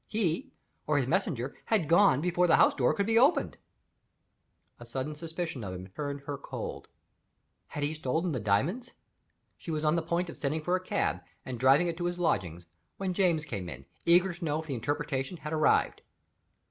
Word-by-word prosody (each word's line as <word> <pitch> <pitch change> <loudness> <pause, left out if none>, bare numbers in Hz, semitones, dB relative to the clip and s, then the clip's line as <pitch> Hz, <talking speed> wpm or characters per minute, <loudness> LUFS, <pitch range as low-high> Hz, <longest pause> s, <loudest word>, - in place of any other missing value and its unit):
He 210 - -1 0.4
(or 150 -1 +2
his 135 - +2
messenger) 140 - -1
had 210 -9 +1
gone 170 -4 +5
before 180 +1 +2
the 165 - +6
house - - +5
door 125 -3 +2
could 200 - 0
be 225 +1 +4
opened! 275 +7 +3 1.2
A 120 - -10
sudden 130 +5 -3
suspicion 160 -3 -5
of 95 -2 -5
him 90 0 -7
turned 145 +6 -5
her 140 0 -5
cold. - - -6 0.8
Had 145 - -5
he 145 +2 0
stolen 160 +3 -1
the 130 - -2
diamonds? 145 - 0 0.7
She - - -9
was 155 -1 -1
on 155 +2 +3
the 170 - +1
point 170 +2 -1
of 170 - -9
sending 150 +2 -2
for 180 +3 +1
a - - 0
cab, - - -1 0.2
and 125 -2 -5
driving 135 +6 +5
it 170 -1 -2
to 175 - -3
his 175 0 -2
lodgings, 90 - -1 0.3
when 190 -2 -2
James 175 -5 +2
came 95 -10 -5
in, 70 -2 -9 0.2
eager 175 +2 +4
to 170 +1 -10
know 155 -1 0
if - - -12
the 145 - -4
interpretation 140 +5 -2
had 155 -1 -6
arrived. 155 -1 +2
155 Hz, 195 wpm, -30 LUFS, 135-175 Hz, 1.2 s, the